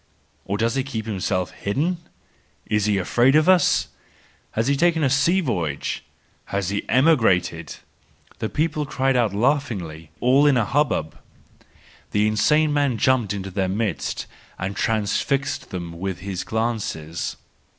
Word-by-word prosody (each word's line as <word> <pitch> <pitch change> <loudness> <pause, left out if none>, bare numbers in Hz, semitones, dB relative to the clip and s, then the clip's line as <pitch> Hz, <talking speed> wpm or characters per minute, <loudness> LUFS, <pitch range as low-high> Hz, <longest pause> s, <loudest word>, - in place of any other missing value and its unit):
Or 100 +1 -2
does 115 +2 +1
he 135 - +1
keep 115 -5 -5
himself 95 -3 -1
hidden? 140 - -1 0.7
Is 105 -1 +1
he 105 -2 +2
afraid 120 +8 +3
of 155 +2 +4
us? 185 -4 +4 0.6
Has 110 - 0
he 140 - +3
taken 165 +1 +2
a 135 - +2
sea 165 +7 +3
voyage? 85 - -2 0.4
Has 100 -2 -2
he 100 0 -3
emigrated?—the 110 - 0
people 155 -1 -1
cried 135 -2 +1
out 120 -4 +2
laughingly, 100 - -1
all 135 +4 +4
in 140 -3 +4
a 115 - +2
hubbub. 125 - 0 0.9
The 105 0 +3
insane 150 +9 +3
man 140 -5 +1
jumped 125 -3 +2
into 95 -1 -4
their 95 0 -1
midst 100 -1 -2 0.3
and 95 +1 -4
transfixed 115 +6 -1
them 85 -2 -5
with 95 -1 -4
his 95 -2 -4
glances. 110 -8 -3
110 Hz, 140 wpm, -23 LUFS, 95-140 Hz, 0.9 s, of